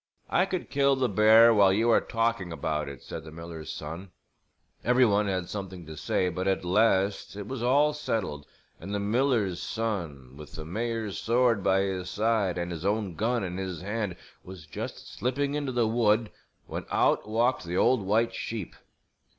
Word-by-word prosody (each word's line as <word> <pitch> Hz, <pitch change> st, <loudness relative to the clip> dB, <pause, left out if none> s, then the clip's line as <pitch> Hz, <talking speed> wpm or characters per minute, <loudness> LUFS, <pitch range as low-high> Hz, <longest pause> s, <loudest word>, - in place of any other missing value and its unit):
"I 180 Hz, +2 st, +3 dB
could 185 Hz, -, -4 dB
kill 140 Hz, -1 st, +3 dB
the 130 Hz, -1 st, +1 dB
bear 110 Hz, +2 st, +6 dB
while 100 Hz, -3 st, +5 dB
you 115 Hz, +4 st, +3 dB
are -, -, +5 dB
talking 115 Hz, -6 st, -1 dB
about 75 Hz, -2 st, -2 dB
it," 70 Hz, -3 st, -10 dB
said 80 Hz, -, -7 dB
the 80 Hz, -, -10 dB
miller's 80 Hz, -1 st, -8 dB
son. 85 Hz, +5 st, -7 dB, 0.7 s
Every 125 Hz, +1 st, +4 dB
one 105 Hz, -1 st, +2 dB
had 95 Hz, -3 st, -1 dB
something 95 Hz, -4 st, -6 dB
to 80 Hz, 0 st, -9 dB
say, 90 Hz, +4 st, 0 dB
but 90 Hz, +2 st, -3 dB
at 95 Hz, -2 st, 0 dB
last 100 Hz, +1 st, +2 dB
it 105 Hz, -1 st, -6 dB
was 130 Hz, -2 st, -5 dB
all 145 Hz, +5 st, +3 dB
settled 95 Hz, -, -3 dB, 0.3 s
and 100 Hz, +4 st, -5 dB
the -, -, 0 dB
miller's 105 Hz, -3 st, +1 dB
son 85 Hz, -, -4 dB
with 75 Hz, 0 st, -11 dB
the 80 Hz, -, -7 dB
mayor's 110 Hz, +3 st, -3 dB
sword 115 Hz, -3 st, +2 dB
by 95 Hz, +1 st, +3 dB
his 95 Hz, -2 st, -2 dB
side 105 Hz, -3 st, +1 dB
and 85 Hz, 0 st, -3 dB
his 85 Hz, -1 st, -6 dB
own 100 Hz, -1 st, 0 dB
gun 115 Hz, +6 st, 0 dB
in 90 Hz, -1 st, -4 dB
his 95 Hz, -3 st, -5 dB
hand 105 Hz, -2 st, -2 dB, 0.3 s
was 90 Hz, -4 st, -10 dB
just 75 Hz, -, -7 dB
slipping 140 Hz, +3 st, -2 dB
into 145 Hz, -2 st, -2 dB
the 120 Hz, -2 st, +1 dB
wood 110 Hz, -1 st, +2 dB, 0.3 s
when -, -, -6 dB
out -, -, +2 dB
walked 120 Hz, +4 st, +1 dB
the 85 Hz, +1 st, -3 dB
old 125 Hz, +1 st, +3 dB
white 110 Hz, +4 st, +1 dB
sheep! 110 Hz, -6 st, -5 dB
100 Hz, 185 wpm, -28 LUFS, 90-115 Hz, 0.7 s, bear